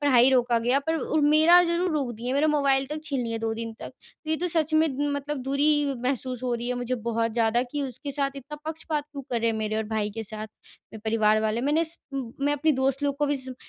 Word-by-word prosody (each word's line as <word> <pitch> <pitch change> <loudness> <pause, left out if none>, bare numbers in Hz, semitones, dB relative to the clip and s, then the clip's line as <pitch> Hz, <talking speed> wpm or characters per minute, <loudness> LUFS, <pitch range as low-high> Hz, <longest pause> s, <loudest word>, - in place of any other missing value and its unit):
पढ़ाई 260 -3 +5
रोका 245 -2 +3
गया, 245 +4 +2
पर 320 +3 -1
उ 315 0 0
मेरा 340 +3 +7
ज़रूर 345 +1 0
रोक 280 -5 -1
दिए, 240 +3 -4
मेरा 290 +3 +3
मोबाइल 275 -3 +2
तक 300 +3 -5
छीन 280 -4 -1
लिया 230 -1 -3
2 225 0 -1
दिन 230 0 -5
तक। - - -6 0.4
तो 310 - -4
ये 315 - +3
तो 355 - -1
सच 320 -2 0
में 315 +1 +5 0.3
मतलब 285 +1 -3
दूरी 285 +1 +2
महसूस 255 -1 -2
हो 250 -1 -1
रही 240 +1 -3
है 250 - 0
मुझे 245 0 -2
बहुत 230 -1 -1
ज़्यादा 230 +1 +2
कि, 285 +3 -4
उसके 270 +2 -5
साथ 275 0 0
इतना 280 +3 -8
पक्षपात 315 -1 -3
क्यों 280 -1 -6
कर 240 -2 0
रहे 230 0 +2
हैं? 225 - -2
मेरे 215 0 -2
और 220 - 0
भाई 215 -1 -1
के 225 +2 -5
साथ, 215 0 -7 0.5
मेरे 220 - -8
परिवार 215 -1 +3
वाले। 220 +1 0
मैंने 295 +5 +2
स 330 +1 -5 0.2
मैं 275 +2 -2
अपनी 300 +2 +2
दोस्त 270 +1 0
लोग 280 -1 0
को 295 +1 +1
भी 290 0 +1
सब 260 -1 -7
270 Hz, 250 wpm, -26 LUFS, 230-295 Hz, 0.5 s, मेरा